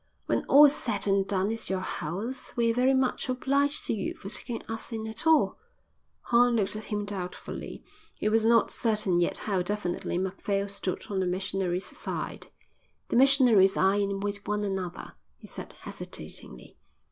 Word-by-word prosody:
"When - - 0
all's 290 +1 +7
said 215 -5 -2
and 195 -1 +2
done 195 +1 +1
it's 225 - -3
your 190 -1 -1
house. 195 +9 -4
We're 230 -1 +3
very 255 +3 +3
much 260 0 0
obliged 280 +3 +1
to - - 0
you 200 -4 -3
for 195 - -9
taking 230 +2 -5
us 225 +2 -6
in 220 -1 -4
at 220 +8 -4
all." 320 -1 +4 0.6
Horn 245 0 +4
looked 210 -2 +1
at 215 - -5
him 210 -1 -2
doubtfully. 190 -3 -6 0.3
He - - -2
was 220 +1 +3
not 230 0 +4
certain 210 -6 +1
yet 175 - +1
how 195 -4 +1
definitely 180 -2 -2
Macphail 195 +2 -1
stood 195 -2 -3
on 195 - 0
the 185 - 0
missionary's 185 0 -1
side. - - -5 0.6
"The - - -1
missionaries 245 -7 +5
are 190 +1 +4
in 200 -1 0
with 200 0 -4
one 210 0 0
another," 190 -3 -4 0.2
he - - -14
said, - - -8
hesitatingly. 60 - -9
205 Hz, 170 wpm, -28 LUFS, 190-235 Hz, 0.6 s, all's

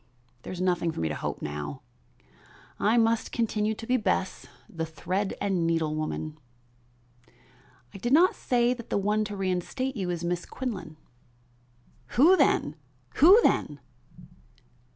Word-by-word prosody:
There - - -8
is 185 - -6
nothing 175 -2 +1
for - - -7
me 80 -1 -1
to - - -3
hope - - -4
for - - -4
now. 75 -1 -6 1.0
I 220 +3 +3
must 225 -1 +2
continue 220 -2 0
to 225 - -8
be 255 +2 +2
Bess, 190 -3 -1 0.2
the 165 -1 -5
thread 185 +5 -3
and 190 -4 0
needle 165 -2 0
woman." 155 0 -4 1.5
"I 195 - -9
did 240 +5 -2
not 340 +6 +5
say 245 0 +1
that 235 -2 -10
the - - 0
one 210 +2 +1
to 205 0 -6
reinstate 195 +8 -2
you 190 -5 -3
was 175 -1 -3
Miss 175 0 -2
Quinlan." 185 -12 -6 1.2
"Who 325 +9 +7
then? 150 - +2 0.4
who 370 +9 +8
then?" - - +1
195 Hz, 150 wpm, -27 LUFS, 165-235 Hz, 1.5 s, who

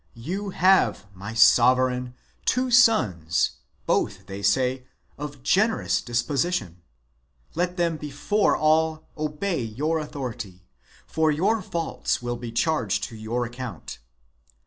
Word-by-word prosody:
You 190 - -4
have, 185 - +3
my 100 +4 -8
sovereign, 125 +2 +4 0.3
two 255 +1 +1
sons, 105 - +3 0.3
both, 95 -2 0
they 100 0 -7
say, 125 +5 +1 0.3
of 145 -3 -8
generous 215 +8 +2
disposition. 120 - -1 0.7
Let 180 +2 -1
them 170 -2 0
before 150 +9 0
all 155 0 +2
obey 155 +3 -2
your 145 +9 -1
authority, 120 -11 -6 0.4
for 160 -1 +1
their 195 +9 +1
faults 170 -3 -2
will 120 0 -3
be 120 -1 -7
charged 120 - 0
to 115 - -11
your 115 +3 -2
account. 120 -6 -8
135 Hz, 115 wpm, -25 LUFS, 115-165 Hz, 0.7 s, sovereign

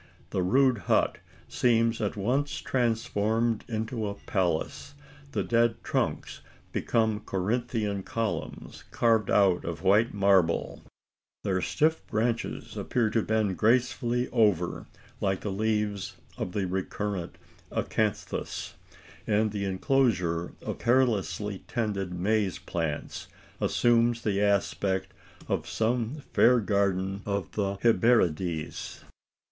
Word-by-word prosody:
The 95 - 0
rude 125 +5 +3
hut - - +2 0.3
seems 115 -1 +2
at 105 0 -2
once 130 +8 0
transformed 115 -2 0
into 110 -1 -3
a 100 - -4
palace 95 - -2 0.4
the - - -1
dead 115 0 +2
trunks - - -2 0.3
become 110 -2 +1
Corinthian 105 +1 -1
columns 115 +2 -4
carved 115 -2 +2
out 95 -3 +4
of 85 0 -5
white 105 +5 +4
marble 95 -4 +2 0.6
their 95 -1 0
stiff 160 - +1
branches 115 +2 -2
appear 115 -3 0
to 115 - +2
bend 105 -4 0
gracefully 120 +1 +2
over, 105 -8 +1 0.3
like 95 -1 0
the 105 - -3
leaves 105 -2 -1 0.2
of 90 - -4
the 100 -2 0
recurrent 95 0 -3 0.3
acanthus 110 -2 -2 0.5
and 110 0 +2
the 100 -1 -2
enclosure 95 -5 +1
of - - -4
carelessly 105 -5 +1
tended 100 -5 -2
maize 100 +2 0
plants 80 -4 -4 0.3
assumes 120 0 +2
the 100 -2 +1
aspect 100 -1 0 0.3
of - - -2
some 120 +5 -1
fair 125 0 +6
garden 100 -2 0
of 100 -4 -3
the 100 -2 -1
Hesperides! 90 -9 +1
105 Hz, 110 wpm, -28 LUFS, 95-115 Hz, 0.6 s, fair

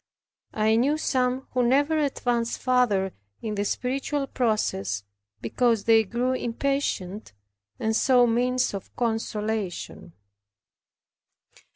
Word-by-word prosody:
I 220 +1 +3
knew 280 +6 +2
some 255 -3 0
who 255 - +1
never 280 +6 +3
advanced 245 -5 0
farther 225 -7 +2 0.3
in 215 - -4
the 205 -1 -1
spiritual 275 +6 -2
process 105 - -1 0.4
because 230 - +1
they 225 0 +5
grew 240 +5 -1
impatient, 235 - -2 0.5
and 220 0 0
sought 245 0 +4
means 250 +1 +1
of 195 - -8
consolation. 220 -6 -3
235 Hz, 100 wpm, -25 LUFS, 215-255 Hz, 0.5 s, they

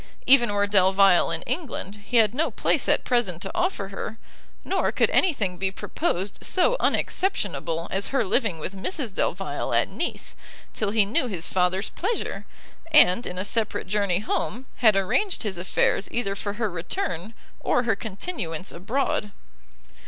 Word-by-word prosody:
Even 240 -5 +5
were 205 0 +2
Delvile 195 -2 +5
in 165 0 -2
England, 210 - -4
he 240 - +1
had 220 -1 +5
no 305 +6 +1
place - - 0
at - - +3
present 240 -9 0
to 195 - -5
offer 345 - -1
her, 210 +3 -6 0.5
nor - - +1
could - - +2
any 375 - +4
thing 195 - -3
be 190 +2 0
proposed 195 - -3
so 370 +7 +3
unexceptionable 175 - 0
as 195 +1 +1
her 270 -4 +1
living 210 -3 +1
with 180 +5 -5
Mrs 240 - -3
Delvile - - -1
at - - +2
Nice, - - -4 0.4
till 210 - -1
he 210 -1 +3
knew 225 +5 0
his 180 -7 -1
father's 185 +2 +1
pleasure, 430 +6 -3 0.4
and, 240 -7 +5
in 180 - -5
a 185 - -2
separate 220 0 -1
journey 200 -2 +1
home, 235 +3 -2
had 220 -4 +5
arranged 225 - +1
his 195 -5 -3
affairs 185 +2 +1
either 200 -5 -2
for 200 0 -4
her 215 -1 -2
return, 175 +4 -4 0.2
or 245 - +1
her 225 -3 +1
continuance 195 - -4
abroad. 210 +2 -1
205 Hz, 160 wpm, -25 LUFS, 185-240 Hz, 0.5 s, Even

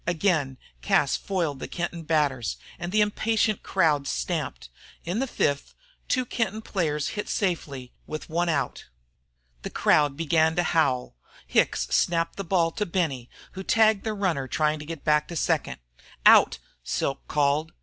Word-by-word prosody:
Again 160 -6 +1 0.2
Cas - - +2
foiled 170 -8 -2
the - - -5
Kenton 175 -1 -4
batters, 145 -7 0 0.2
and 175 +1 -4
the 215 +1 +3
impatient 215 0 +1
crowd 150 -7 +1
stamped. - - -3 0.4
In 180 +6 -2
the 270 - 0
fifth, 145 - -1 0.3
two 255 -2 +1
Kenton 220 -2 -2
players 150 -8 -1
hit 210 - -5
safely 140 -10 -2
with 155 0 -6
one 170 +2 0
out. 155 -4 -2 0.8
The - - -5
crowd 145 -2 +2
began 160 0 +2
to 175 - +2
howl. 155 - +1 0.3
Hicks - - +2
snapped 165 -1 +1
the 195 - -3
ball 170 -2 +1
to 210 +2 -2
Benny, 155 -9 -2 0.2
who 190 - -7
tagged 220 0 +3
the 220 -1 -2
runner 170 -10 -1
trying 150 +3 0
to 150 - -8
get 165 -2 -7
back 150 0 +2
to 170 - -7
second. - - 0 0.5
"Out!" - - +7 0.7
called 150 +1 +1
Silk. - - -32
165 Hz, 155 wpm, -26 LUFS, 145-190 Hz, 0.8 s, Out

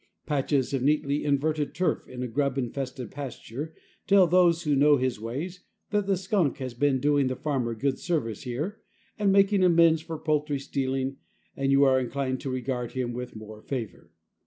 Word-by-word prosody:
Patches 140 -2 0
of 135 - 0
neatly 145 +1 +1
inverted 150 +1 0
turf 180 0 0
in 125 0 -6
a - - -2
grub 140 +3 -1
infested 130 0 -4
pasture 140 +2 -7 0.3
tell 195 -2 +6
those 175 -1 +4
who 150 -2 +2
know 145 +1 +5
his 130 -3 -1
ways 150 - -5 0.3
that 205 -1 +1
the 195 -2 +2
skunk 185 -5 0
has 130 -3 -5
been 135 +2 +1
doing 145 0 +2
the 130 - -1
farmer 130 -6 -2
good 130 +4 -1
service 115 - -2
here, 150 - -4 0.4
and 200 -2 +3
making 195 0 +4
amends 165 -2 +5
for 160 0 -6
poultry 150 -2 0
stealing, 135 0 -2 0.4
and 135 0 0
you 140 +1 +5
are 130 -1 +5
inclined 130 +1 -2
to 140 - -4
regard 125 -1 -3
him 125 -2 -2
with 125 0 -6
more 110 0 -10
favor. 120 -5 -6
140 Hz, 180 wpm, -27 LUFS, 130-160 Hz, 0.4 s, tell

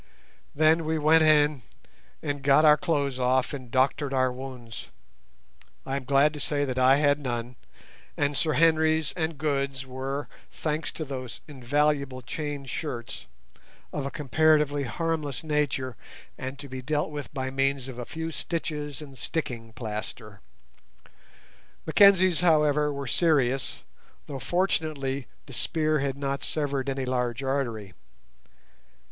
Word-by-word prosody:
Then 155 +2 +4
we 160 +1 0
went 155 +2 +5
in 150 -3 +4 0.6
and 145 -2 -2
got 140 +3 +5
our 150 -1 +8
clothes 140 -5 -1
off 130 +1 +2
and 130 -4 -7
doctored 135 +2 +1
our 130 -1 +3
wounds; 125 -3 -8 1.0
I 135 - -2
am 140 -2 -3
glad 140 +3 +4
to 150 - -7
say 145 0 0
I 130 +1 +4
had 145 0 +3
none, 120 -2 -4 0.6
and 145 0 +1
Sir 155 +1 +2
Henry's 160 -1 +3
and 160 -2 -2
Good's 140 -3 -1
were, 135 +2 -4 0.2
thanks 155 0 -2
to 155 - -5
those 130 -3 -6
invaluable 140 -1 0
chain 145 +1 -4
shirts, 125 -3 -5 0.7
of 140 -2 -2
a - - -3
comparatively 150 +1 +2
harmless 155 +3 -2
nature, 145 -5 -1 0.4
and 130 +1 -6
to 140 0 -8
be 130 -1 -6
dealt 150 +3 -1
with 145 -2 -6
by 130 -2 -3
means 135 -1 0
of 125 -2 -7
a 120 - -4
few 160 +4 -5
stitches 150 -3 -4
and 135 -3 -12
sticking 120 -8 -4
plaster. 105 -2 -6 1.4
Mackenzie's, 185 0 +6
however, 150 -3 +3
were 140 -1 -4
serious, 135 -3 +1 0.4
though 140 -2 -6
fortunately 150 -6 -1 0.2
the 135 - -11
spear 155 +2 0
had 135 0 -1
not 140 0 -2
severed 140 -3 -1
any 135 -1 -2
large 125 0 -1
artery. 120 -8 -2
140 Hz, 135 wpm, -27 LUFS, 130-155 Hz, 1.4 s, our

